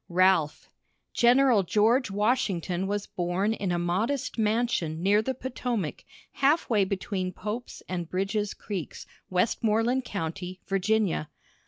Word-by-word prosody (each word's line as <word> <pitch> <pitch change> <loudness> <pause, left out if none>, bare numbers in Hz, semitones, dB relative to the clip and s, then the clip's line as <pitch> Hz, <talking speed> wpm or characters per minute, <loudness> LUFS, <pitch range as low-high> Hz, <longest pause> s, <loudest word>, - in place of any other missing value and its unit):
RALPH. 180 -4 +2 0.5
General 245 -2 +5
George 220 +6 +2
Washington 195 -4 0
was 205 0 -2
born 180 +4 -1
in 195 -4 -2
a 175 - +1
modest 190 +11 -1
mansion 210 -8 0
near 205 +2 +4
the 260 +4 -2
Potomac, 245 - -3 0.3
half 290 +5 +2
way 210 -3 +4
between 190 -1 -2
Pope's 215 +6 -6
and 175 -2 -4
Bridge's 195 +2 -1
creeks, 195 -6 -6 0.2
Westmoreland 225 +6 +1
County, 180 -2 -5
Virginia. 195 -4 0
200 Hz, 120 wpm, -27 LUFS, 180-225 Hz, 0.5 s, General